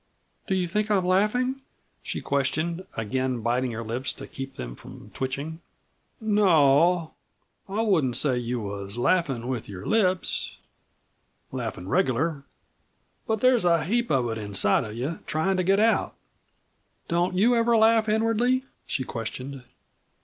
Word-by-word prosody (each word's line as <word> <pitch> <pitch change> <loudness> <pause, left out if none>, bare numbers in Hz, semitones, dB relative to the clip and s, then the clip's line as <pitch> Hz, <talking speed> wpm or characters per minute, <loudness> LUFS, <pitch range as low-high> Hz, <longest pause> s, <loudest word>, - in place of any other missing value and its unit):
"Do 190 - +1
you 180 -2 0
think 210 +5 -1
I 205 - +4
am 185 - 0
laughing?" 245 +8 +1 0.4
she - - -4
questioned, 155 +6 -1
again 125 +2 -1
biting 125 +3 0
her 115 +1 -4
lips 120 +4 -2
to - - -9
keep 135 0 -8
them - - -6
from - - -13
twitching. 140 +5 -4 0.6
"No 210 -2 +2
o. 160 +2 +4 0.6
I 215 +3 0
wouldn't 155 - +2
say 140 +1 +2
that 125 - 0
you 120 0 -2
was 100 0 -6
laughin' 135 -4 +1
with 125 -5 -4
your 95 -1 -8
lips 185 -4 +1 0.9
laughin' 90 - -5
regular. 140 +8 +1 0.9
But 220 -1 0
there's 255 -4 +4
a 170 -2 +3
heap 235 +7 0
of 130 -4 +2
it 115 - -4
inside 100 +3 +1
of 105 0 -7
you 135 +8 -3
tryin' 160 +5 +1
to 185 - +1
get 195 +3 +3
out." 225 +1 +2 0.9
"Don't 175 +2 0
you 235 +5 +4
ever 230 0 +3
laugh 220 0 +4
inwardly?" 225 +4 +2 0.2
she 130 - -1
questioned. 130 +3 -5
160 Hz, 150 wpm, -26 LUFS, 125-210 Hz, 0.9 s, I